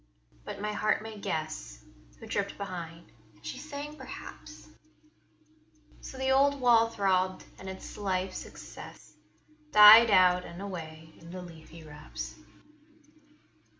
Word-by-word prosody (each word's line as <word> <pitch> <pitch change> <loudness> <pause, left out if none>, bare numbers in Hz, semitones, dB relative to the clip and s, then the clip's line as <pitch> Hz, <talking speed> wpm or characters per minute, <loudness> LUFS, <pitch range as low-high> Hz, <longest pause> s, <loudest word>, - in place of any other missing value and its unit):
But - - -7
my 210 +1 -3
heart 215 0 0
may 220 -1 -8
guess 155 - -5 0.3
Who - - -10
tripped - - -3
behind; 170 -4 -7 0.2
and 105 - -21
she 260 - -6
sang, 295 0 -7
perhaps: 265 -1 -11 1.3
So 265 - -10
the 265 0 0
old 280 +1 +3
wall 235 -2 +5
throbbed, 185 -3 0 0.2
and 190 - -8
its 190 +2 -9
life's 190 -2 -2
excess - - -12 0.6
Died 215 +2 +10
out 180 -2 +5
and 170 0 -10
away 160 -5 -8
in 165 - -14
the 180 +1 -7
leafy 165 -1 -13
wraps. 150 -1 -8
190 Hz, 125 wpm, -29 LUFS, 165-225 Hz, 1.3 s, Died